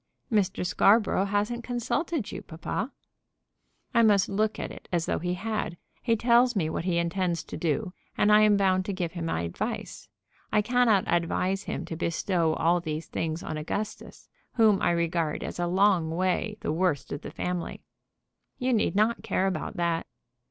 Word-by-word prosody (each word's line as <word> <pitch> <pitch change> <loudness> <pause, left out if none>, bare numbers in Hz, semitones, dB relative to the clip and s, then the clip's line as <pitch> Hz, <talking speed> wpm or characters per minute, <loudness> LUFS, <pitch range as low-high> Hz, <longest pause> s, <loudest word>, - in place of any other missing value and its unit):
"Mr. 200 -4 +1
Scarborough 200 +1 +3
hasn't 210 +4 -1
consulted 250 - -2
you, - - -6
papa." 195 - -4 1.0
"I 235 - +5
must 205 -4 +4
look 215 +2 0
at - - -4
it - - -12
as 170 -2 +1
though - - -1
he 180 +1 -2
had. 210 -3 -3 0.2
He 230 -2 +2
tells 240 +2 +4
me 160 -5 0
what 165 - -3
he 180 -2 +1
intends 170 0 0
to - - -8
do, 180 +4 -1 0.2
and 210 - +4
I 210 0 +7
am 210 -1 +5
bound 190 -1 +2
to 200 - -2
give 175 -3 -2
him 170 -1 -4
my 80 - -1
advice. 85 0 -5 0.4
I 210 0 +3
cannot 235 -4 +3
advise 185 +3 0
him - - -4
to 165 - -5
bestow 165 0 0
all 175 +2 +2
these 160 -1 -4
things 160 +1 -3
on 155 - -4
Augustus, 205 +7 -5 0.3
whom 220 -4 +4
I - - +3
regard 170 -2 0
as - - -6
a 175 - 0
long 185 -2 +3
way 185 +5 -1
the - - -1
worst 160 -5 0
of 145 - -4
the - - -7
family." 180 -1 -4 0.7
"You 255 0 0
need 215 -3 +1
not 215 +3 +2
care 190 - 0
about 190 -1 -2
that." 170 -1 0
185 Hz, 180 wpm, -27 LUFS, 170-215 Hz, 1.0 s, I